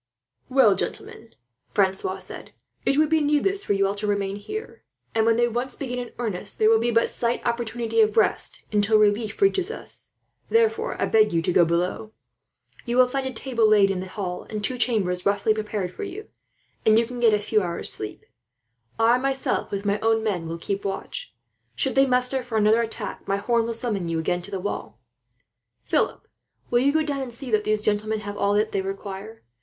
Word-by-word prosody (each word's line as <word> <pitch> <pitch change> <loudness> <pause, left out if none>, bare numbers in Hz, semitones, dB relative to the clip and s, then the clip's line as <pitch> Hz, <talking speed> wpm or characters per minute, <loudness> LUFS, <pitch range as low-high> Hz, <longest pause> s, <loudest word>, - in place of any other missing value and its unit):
"Well, 255 -7 +5
gentlemen," 225 +3 -5 0.4
Francois 190 -1 +1
said, 185 - -9 0.3
"it 275 - +3
would 305 0 +4
be 320 -1 +3
needless 300 +7 +1
for - - 0
you 195 0 +2
all 195 - 0
to 205 +1 -4
remain 200 -1 -1
here; 425 - -7 0.3
and 225 0 +2
when 230 - +4
they 240 +1 +3
once 240 +2 -3
begin 250 -3 -4
in 245 -1 -6
earnest, 220 -7 -2
there 220 0 +4
will 225 - +5
be 235 +1 0
but 230 0 +3
slight 235 0 -2
opportunity 235 -1 0
of 215 0 +2
rest 220 - +1
until 210 +1 +4
relief 210 +1 +1
reaches 390 -1 +3
us. 460 - -5 0.4
Therefore, 450 0 +1
I - - +2
beg 215 -1 +4
you 165 -1 +1
to 180 - +1
go 175 - +5
below. 180 +6 -1 0.7
You 240 0 -2
will 255 0 +6
find 265 +1 -2
a - - -3
table 235 -2 +1
laid 200 -2 +5
in 190 - -2
the 185 - -5
hall, 185 -2 -5
and 210 -1 -4
two 250 +4 0
chambers 200 -7 +1
roughly 200 +2 +2
prepared 210 -4 -3
for - - -8
you; 400 +2 -7 0.5
and 220 0 +5
you 230 - +3
can 245 +1 -7
get 230 -3 +5
a - - 0
few 210 +1 +1
hours' 175 -2 -2
sleep. 110 -1 -6 0.7
"I 230 +2 +4
myself, 270 0 -1
with 200 0 -4
my 200 +1 +1
own 225 0 +2
men, 185 -7 -1
will 165 +1 -4
keep 195 +4 -3
watch. 200 - -5 0.4
Should 265 - 0
they 270 0 +4
muster 250 +1 +2
for 240 -3 -3
another 215 +2 +4
attack, 225 -1 -4
my 195 0 +1
horn 230 +3 +1
will 230 - -2
summon 220 -6 -2
you 165 -1 -1
again 175 +2 -1
to 180 - -8
the 195 -2 -3
wall. 205 +3 -5 0.8
"Philip, - - -1 0.4
will 240 - +4
you 275 +3 +3
go 315 +1 +2
down 290 -2 -2
and 260 -2 -5
see 245 +2 -7
that 215 -1 +2
these 215 0 +1
gentlemen 215 +1 0
have 205 0 -6
all 200 0 +1
that 215 +1 +1
they 195 - 0
require? 195 +3 -7
220 Hz, 210 wpm, -24 LUFS, 200-245 Hz, 0.8 s, will